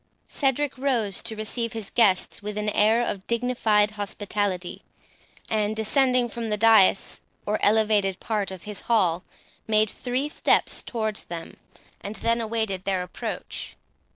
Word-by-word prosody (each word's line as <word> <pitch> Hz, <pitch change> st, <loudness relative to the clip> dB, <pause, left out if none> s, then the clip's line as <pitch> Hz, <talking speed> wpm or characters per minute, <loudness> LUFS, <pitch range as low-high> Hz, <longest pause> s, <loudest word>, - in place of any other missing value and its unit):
Cedric 275 Hz, -1 st, 0 dB
rose 235 Hz, -8 st, 0 dB
to 225 Hz, -1 st, -3 dB
receive 230 Hz, +2 st, -3 dB
his 220 Hz, -3 st, -6 dB
guests 200 Hz, -6 st, +2 dB
with 210 Hz, 0 st, -5 dB
an 210 Hz, 0 st, 0 dB
air 220 Hz, +3 st, +3 dB
of 195 Hz, 0 st, -4 dB
dignified 230 Hz, -3 st, +2 dB
hospitality, 205 Hz, -3 st, -3 dB, 0.7 s
and, 215 Hz, -1 st, 0 dB
descending 250 Hz, +2 st, +2 dB
from 230 Hz, -1 st, -5 dB
the 210 Hz, -, 0 dB
dais, 215 Hz, -3 st, +4 dB, 0.2 s
or 210 Hz, +1 st, 0 dB
elevated 205 Hz, -3 st, +3 dB
part 210 Hz, -3 st, -2 dB
of 190 Hz, -2 st, -8 dB
his 210 Hz, -2 st, -6 dB
hall, 180 Hz, -7 st, +3 dB, 0.4 s
made 215 Hz, -1 st, +3 dB
three 255 Hz, +3 st, -2 dB
steps 300 Hz, -, +1 dB
towards 220 Hz, -3 st, -3 dB
them, 170 Hz, -1 st, -8 dB, 0.4 s
and 205 Hz, +2 st, -6 dB
then 230 Hz, +1 st, +1 dB
awaited 220 Hz, -4 st, -2 dB
their 190 Hz, -2 st, 0 dB
approach. 180 Hz, -, -6 dB
215 Hz, 140 wpm, -25 LUFS, 200-230 Hz, 0.7 s, dais